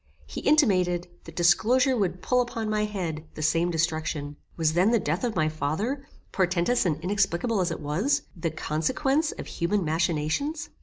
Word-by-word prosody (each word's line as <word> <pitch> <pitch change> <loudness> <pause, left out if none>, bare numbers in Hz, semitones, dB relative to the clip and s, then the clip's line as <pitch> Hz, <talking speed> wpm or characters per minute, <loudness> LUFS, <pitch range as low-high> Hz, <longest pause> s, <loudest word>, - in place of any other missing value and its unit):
He - - -7
intimated, 185 - +3 0.2
that 165 - -11
disclosure 235 +10 +3
would 185 -5 -1
pull 250 0 +3
upon 230 -3 -3
my 210 0 +1
head, 175 -7 -4
the 155 - -4
same 165 +3 +2
destruction. 155 -3 -2 0.2
Was 160 -2 +2
then 180 +5 +4
the 235 - +4
death 165 +2 -2
of 235 -3 -1
my 155 -2 +2
father, 195 - -2 0.2
portentous 185 +4 +1
and 155 -3 -1
inexplicable 195 +3 0
as 180 - 0
it 165 - -5
was, 205 - 0
the 170 -1 -2
consequence 260 - 0
of - - -8
human 185 +2 -1
machinations? 165 - -1
180 Hz, 165 wpm, -26 LUFS, 160-230 Hz, 0.2 s, then